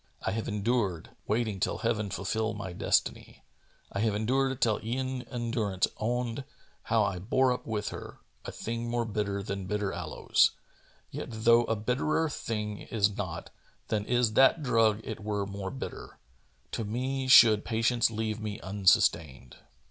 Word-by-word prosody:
—I - - 0
have 110 +2 -3
endured 105 -5 -1 0.2
Waiting 110 -2 0
till - - 0
Heaven 110 -3 -1
fulfil 110 +3 -2
my 95 -3 -6
destiny.— - - -1 0.5
I 100 - -3
have 110 -1 +1
endured 130 +4 0
till 110 -3 +2
e'en 130 +3 -2
endurance 115 -6 0
owned 120 +3 -2 0.4
How - - +3
I 90 - -1
bore 130 +7 +2
up 125 - -7
with 110 -2 -2
her; - - -8 0.3
(a - - -6
thing 115 +1 -4
more 120 0 0
bitter 100 -2 -2
Than 100 -1 -4
bitter 105 -1 -1
aloes) 85 -3 +2 0.6
yet - - -5
though 115 +1 +4
a 115 - 0
bitterer 125 +9 0
thing 105 -5 -4
Is 105 -3 0
not, 85 -6 -5 0.4
than 105 -1 0
is 120 -3 +2
that 135 +6 +5
drug 115 -4 +3
it - - -6
were 105 -1 -2
more 100 -1 -5
bitter 135 - -8 0.5
To 115 - -2
me 130 +5 -2
should 110 -5 +8
Patience 115 +1 +2
leave 110 -1 -3
me 105 -1 -5
unsustained." 80 -9 +1
110 Hz, 155 wpm, -29 LUFS, 100-120 Hz, 0.6 s, should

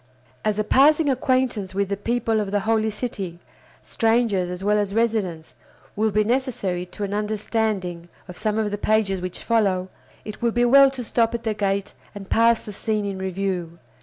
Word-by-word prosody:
As 215 -1 0
a 215 - +1
passing 290 +6 +4
acquaintance 255 -7 0
with 200 -1 0
the 200 - 0
people 225 +1 0
of 205 -2 -2
the 205 0 0
Holy 220 +1 +1
City, 200 -6 -5 0.5
strangers 225 -5 +1
as 180 +1 -6
well 210 +1 +2
as 205 0 -2
residents, 210 -8 -1 0.4
will 220 +1 +1
be 215 +1 +2
necessary 210 -7 -1
to 205 +3 -7
an 200 0 -3
understanding 210 -4 -2 0.2
of 180 - -9
some 215 +1 -1
of 215 -2 0
the 205 - -3
pages 210 -4 +1
which 180 0 -6
follow, 195 -5 +1 0.4
it 215 +2 -8
will 235 - +2
be 240 +1 +2
well 275 +3 +7
to 265 -2 -6
stop 230 0 +1
at 235 - -5
the 220 -2 0
gate 200 -1 -1 0.2
and 195 -1 -9
pass 230 0 +4
the 210 - -8
scene 215 +1 -2
in 195 -1 -4
review. 185 -3 -3
210 Hz, 190 wpm, -23 LUFS, 195-230 Hz, 0.5 s, well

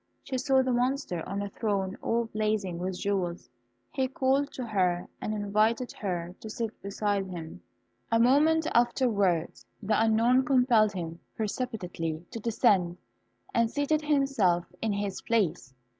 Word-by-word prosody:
She 260 -2 -3
saw 265 0 +3
the 260 - 0
Monster 250 - 0
on 200 +1 -2
a 200 - -4
throne 195 -3 -1
all 235 0 0
blazing 215 -5 -1
with 185 0 -3
jewels; 180 -10 -2 0.4
he 265 -2 0
called 270 +2 +1
to 255 - -4
her 185 -5 0
and - - -2
invited 215 +3 +1
her 175 -3 -4
to 220 - -8
sit 225 0 -5
beside 200 0 -1
him. 170 -3 -8 0.5
A 230 - +4
moment 300 +6 +4
afterwards, 215 -8 +1 0.2
the 215 +1 +1
unknown 230 +4 +4
compelled 245 -5 +4
him 170 -2 -5 0.2
precipitately 180 -8 -3
to 235 - -5
descend, 195 -5 +2 0.6
and 230 -1 +3
seated 290 +4 0
himself 275 - +2 0.2
in 225 - 0
his 200 -1 -3
place. 190 - 0
215 Hz, 145 wpm, -28 LUFS, 190-250 Hz, 0.6 s, A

